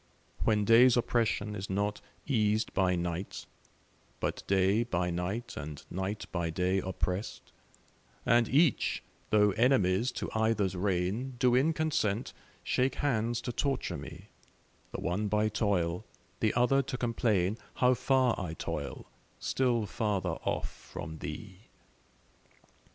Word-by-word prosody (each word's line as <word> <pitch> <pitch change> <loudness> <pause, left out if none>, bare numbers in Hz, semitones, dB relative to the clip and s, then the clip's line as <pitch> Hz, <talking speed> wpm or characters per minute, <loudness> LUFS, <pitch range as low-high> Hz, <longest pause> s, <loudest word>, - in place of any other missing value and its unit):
When 105 -2 +3
day's 120 +3 +7
oppression 115 -3 +1
is 100 0 -5
not 100 +2 -1 0.2
eas'd 110 -5 +1
by 95 -2 +2
night, 85 +2 -4 0.7
But - - -2
day 100 +3 +3
by 90 -6 -1
night 90 +7 -3
and 75 +1 -7
night 95 +3 -3
by 85 -2 -1
day 90 +3 +1
oppress'd, 95 +2 -3 0.7
And 120 0 +4
each, 145 -1 +2 0.3
though 105 -1 +4
enemies 115 -1 +3
to - - -4
either's 110 -4 +1
reign, 100 +7 -1
Do 125 -1 +3
in 135 +6 +4
consent 150 -9 0 0.3
shake 130 0 +1
hands 120 -4 0
to - - -3
torture 135 +2 -1
me, 85 +7 -9 0.6
The - - -5
one 100 +4 -1
by 105 +1 +2
toil, 100 -4 0 0.4
the 110 - +1
other 125 +3 +4
to 130 -1 -4
complain 110 -4 +1 0.2
How 125 0 +4
far 130 -1 +2
I 85 -4 -4
toil, - - -5 0.3
still 120 -4 +1
farther 105 -2 -1
off - - -1
from 85 -3 -9
thee. 95 +6 -8
105 Hz, 130 wpm, -31 LUFS, 95-120 Hz, 0.7 s, day's